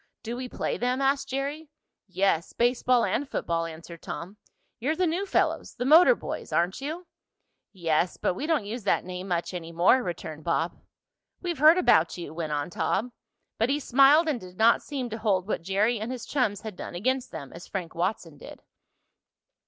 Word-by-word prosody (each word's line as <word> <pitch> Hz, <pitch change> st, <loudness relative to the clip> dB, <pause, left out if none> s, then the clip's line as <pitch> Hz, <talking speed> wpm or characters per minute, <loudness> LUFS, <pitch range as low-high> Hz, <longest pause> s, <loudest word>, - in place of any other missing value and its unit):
"Do 235 Hz, +1 st, -4 dB
we 250 Hz, 0 st, -5 dB
play -, -, -2 dB
them?" 250 Hz, +2 st, 0 dB
asked 275 Hz, 0 st, +1 dB
Jerry. 285 Hz, +3 st, -3 dB, 0.4 s
"Yes, 185 Hz, -3 st, 0 dB
baseball 245 Hz, 0 st, +2 dB
and 285 Hz, 0 st, -1 dB
football," 165 Hz, 0 st, -1 dB
answered 165 Hz, +1 st, -10 dB
Tom. 185 Hz, +5 st, -7 dB, 0.4 s
"You're 285 Hz, +7 st, 0 dB
the 365 Hz, -, +1 dB
new 355 Hz, +4 st, -1 dB
fellows 350 Hz, -4 st, 0 dB
the 245 Hz, -, -3 dB
motor 335 Hz, -, +7 dB
boys -, -, -6 dB
aren't 175 Hz, +8 st, 0 dB
you?" 320 Hz, +6 st, -5 dB, 0.7 s
"Yes, 170 Hz, -2 st, 0 dB
but -, -, 0 dB
we 280 Hz, +12 st, -4 dB
don't 315 Hz, -10 st, +1 dB
use 225 Hz, +3 st, -5 dB
that 200 Hz, -, +1 dB
name 185 Hz, +1 st, -6 dB
much 175 Hz, 0 st, -2 dB
any 170 Hz, -2 st, -6 dB
more," 175 Hz, +10 st, +4 dB
returned 165 Hz, -6 st, -6 dB
Bob. 170 Hz, 0 st, 0 dB, 0.6 s
"We've 345 Hz, -5 st, -4 dB
heard 310 Hz, +4 st, +7 dB
about 175 Hz, -, +3 dB
you," 170 Hz, -3 st, -7 dB
went 160 Hz, -2 st, -4 dB
on 145 Hz, +3 st, -2 dB
Tom, 235 Hz, +7 st, -1 dB, 0.5 s
but 225 Hz, +3 st, +2 dB
he 285 Hz, +2 st, +1 dB
smiled 275 Hz, +4 st, +5 dB
and 290 Hz, -6 st, 0 dB
did 180 Hz, 0 st, -12 dB
not 225 Hz, +1 st, +5 dB
seem 270 Hz, -4 st, -4 dB
to 225 Hz, -, -4 dB
hold 195 Hz, -4 st, +1 dB
what 215 Hz, -, -2 dB
Jerry 205 Hz, +6 st, +1 dB
and 220 Hz, +4 st, -4 dB
his 255 Hz, -3 st, -6 dB
chums 245 Hz, -8 st, 0 dB
had 215 Hz, -3 st, -7 dB
done 175 Hz, -, -7 dB
against 255 Hz, +7 st, -1 dB
them, 140 Hz, -, -8 dB
as 170 Hz, -, -10 dB
Frank 180 Hz, -4 st, -5 dB
Watson 170 Hz, -4 st, -3 dB
did. -, -, -12 dB
220 Hz, 190 wpm, -27 LUFS, 175-275 Hz, 0.7 s, motor